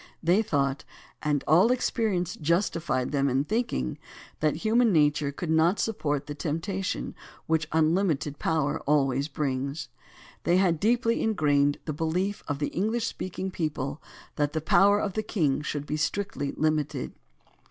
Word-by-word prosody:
They 175 +6 +4
thought, 140 -7 0 0.4
and 145 -2 0
all 180 +10 +5
experience 215 -8 0
justified 165 -5 0
them 140 -1 +1
in 135 +2 +1
thinking, 200 - -2 0.4
that 155 -1 +1
human 230 +1 +4
nature 150 -3 +3
could 160 +3 -4
not 165 +5 +3
support 145 -10 -1
the 145 - -5
temptation 165 +6 -3 0.3
which 160 -1 +1
unlimited 160 -2 +1
power 155 -3 0
always 140 -1 +2
brings. 140 0 -3 0.5
They 175 - +3
had 175 -4 +2
deeply 230 +3 +2
ingrained 145 -9 +2
the 155 - -2
behef 175 +6 -1
of 145 - -2
the 145 - -2
Enghsh 220 +5 0
speaking 185 -3 -4
people 150 -4 -3 0.4
that 145 -1 0
the 160 - 0
power 200 +6 +4
of 200 -2 -2
the 215 - -1
king 160 -11 0
should 145 -1 -4
be 150 - -2
strictly 150 -2 -2
Hmited. 150 -3 -1
155 Hz, 145 wpm, -27 LUFS, 145-190 Hz, 0.5 s, all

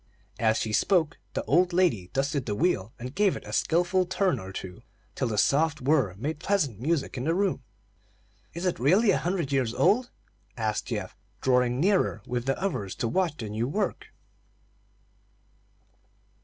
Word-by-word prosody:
As 110 -1 +3
she 110 -1 -2
spoke, 165 - +2 0.2
the - - -1
old 175 +4 +3
lady 160 - +2
dusted 140 -1 -1
the 105 - -1
wheel, 115 - 0
and 125 +2 -7
gave 200 +2 +2
it - - -8
a - - -8
skilful 175 +2 +2
turn 185 0 +1
or 95 0 -8
two, 95 -2 -8 0.3
till 130 - -1
the 110 -2 -2
soft 150 +7 +2
whir 130 - +2
made 145 +9 -4
pleasant 150 - 0
music 145 0 -1
in 125 - -3
the 165 +2 +1
room. 190 -6 0 0.9
"Is 170 +2 -4
it 180 - 0
really 190 - +4
a - - +1
hundred 175 -5 -2
years 125 -4 0
old?" 215 - +3 0.5
asked 110 -2 -2
Geoff, 105 -6 -4 0.2
drawing 125 -1 +2
nearer 185 - +2
with 125 -1 -3
the 135 - 0
others 110 - -2
to 115 - -2
watch 165 +4 0
the 110 -3 -5
new 110 +3 -2
work. 205 +9 -2
140 Hz, 170 wpm, -27 LUFS, 115-180 Hz, 0.9 s, really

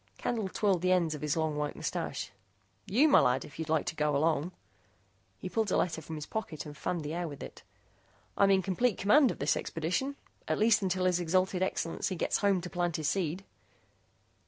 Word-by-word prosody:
Candle 220 -5 -2
twirled 195 -3 +1
the 185 0 +2
ends 170 -4 +2
of 150 - -7
his 150 +1 -1
long 160 -1 0
white 150 0 -2
moustache. - - -4 0.6
"You, 255 +10 +4
my 295 - +7
lad, 125 +1 +2
if 145 - -13
you'd 160 -1 -4
like 160 -1 +1
to - - -3
go 150 -1 +1
along." 160 +2 +1 0.9
He - - -6
pulled 220 +2 0
a - - +3
letter 160 -2 0
from 160 +1 -7
his 150 -1 -6
pocket 195 -7 -5
and 150 -1 -9
fanned 170 +2 -3
the 150 +1 -4
air 175 0 -2
with 145 -3 -8
it. - - -10 0.7
"I'm 200 - +4
in 190 -1 +4
complete 200 +3 +1
command 260 +7 +5
of - - -4
this 140 - +1
expedition 180 - -2 0.3
at - - 0
least 215 0 +4
until 185 -1 0
His 180 -1 +2
Exalted 185 +2 +1
Excellency 185 0 -1
gets - - 0
home 200 -3 +2
to 180 - -6
plant 175 -2 -1
his 155 -2 0
seed." 180 0 -1
175 Hz, 205 wpm, -30 LUFS, 155-195 Hz, 0.9 s, my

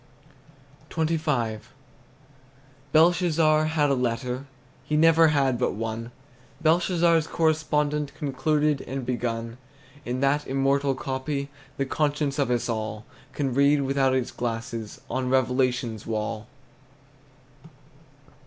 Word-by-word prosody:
XXV. 150 -9 -1 1.3
Belshazzar 160 -1 +4
had 155 -2 +1
a - - +4
letter, 125 +1 -2 0.4
He 150 +2 -1
never 165 +1 +6
had 135 -5 +2
but 125 - +1
one; 115 +2 -4 0.5
Belshazzar's 170 0 +3
correspondent 150 -2 0
Concluded 150 +1 0
and 135 0 -4
begun 115 -1 -3 0.4
In 125 0 -3
that 145 +2 +1
immortal 135 +1 +1
copy 140 +2 -3 0.3
The 135 - 0
conscience 145 0 -1
of 140 - +1
us 120 -1 0
all 110 -2 -3 0.3
Can 135 -4 -1
read 140 +2 +4
without 135 -1 +2
its 130 -1 -1
glasses 115 -2 -4
On 130 -1 -2
revelation's 125 -3 0
wall. 110 0 -3
135 Hz, 105 wpm, -25 LUFS, 120-150 Hz, 1.3 s, never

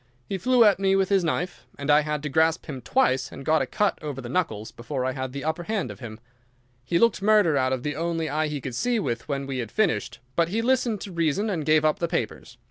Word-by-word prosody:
He 195 - -3
flew 250 +5 +4
at 205 -3 +5
me 195 0 +3
with 195 -1 +2
his 195 -2 +3
knife, 175 +2 -2
and 145 +1 0
I 145 - +7
had 150 -1 -3
to 150 - -2
grasp 160 +3 +2
him 135 -5 -6
twice, 130 - +1
and 135 - -9
got 155 0 +3
a - - -1
cut 205 -1 0
over 145 -4 -5
the 120 -2 -7
knuckles, 110 - -2
before 130 +2 -4
I 130 - 0
had 130 -1 -4
the 140 +1 -6
upper 160 +2 -1
hand 215 0 -2
of - - -11
him. 115 -3 -8 0.6
He 170 +7 0
looked 230 0 +3
murder 210 -6 +4
out 130 -1 +2
of 130 -1 -2
the 150 -1 -2
only 165 0 -1
eye 155 +1 0
he 150 -2 -4
could 130 0 -5
see 245 - 0
with 120 - -2
when 140 -2 -2
we 135 -1 -3
had 115 -3 -4
finished, 180 - 0 0.2
but 165 +2 +2
he 225 +5 -1
listened 240 -4 +1
to 200 - -7
reason 170 +5 0
and 165 -5 -2
gave 155 0 +4
up 155 - +2
the 170 - 0
papers. 120 -6 -4
155 Hz, 260 wpm, -25 LUFS, 135-195 Hz, 0.6 s, I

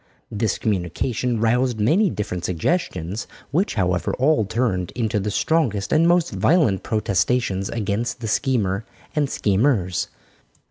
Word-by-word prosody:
This 105 -1 0
communication 110 +5 -1
roused 120 +1 +1
many 170 - +3
different 90 - -4
suggestions, 95 - -2 0.2
which, 180 +8 0
however, 90 -3 0
all 135 -3 +3
turned 100 -5 -1
into 110 -3 0
the 105 +2 -2
strongest 110 -4 0
and 165 +2 +4
most 175 -1 +3
violent 150 - +2
protestations 105 -1 0
against 115 +2 -2
the 115 - -4
schemer 110 -4 0 0.3
and 145 -2 +1
schemers. 100 -5 +1
110 Hz, 125 wpm, -22 LUFS, 95-130 Hz, 0.3 s, and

